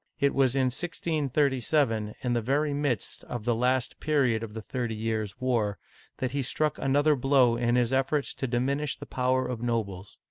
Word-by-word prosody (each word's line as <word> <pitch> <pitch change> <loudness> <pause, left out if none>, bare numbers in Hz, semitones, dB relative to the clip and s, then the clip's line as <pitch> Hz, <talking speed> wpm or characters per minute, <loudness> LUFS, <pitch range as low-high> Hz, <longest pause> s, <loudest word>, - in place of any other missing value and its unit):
It 140 0 +2
was 135 -2 +2
in 130 -2 +2
1637, 140 -7 0
^^ 125 -1 0
the 120 - +1
very 145 +5 +1
midst 140 -5 -2
of 120 -3 -6
the 120 - +2
last 125 +2 0
period 135 -7 +2
of 110 -1 -7
the 110 - -4
Thirty 120 -1 -3
Years' 110 0 -3
War, 115 -6 0 0.4
that 130 -2 -2
he 140 +1 -1
struck 150 +3 -1
another 145 +3 +3
blow 130 -2 +4
in 120 0 +1
his 125 0 +2
efforts 135 +2 +1
to 135 - -3
diminish 135 +4 -1
the - - -9
power 130 0 0
of 125 -2 -4
nobles. 105 -5 -3
125 Hz, 180 wpm, -28 LUFS, 115-140 Hz, 0.4 s, blow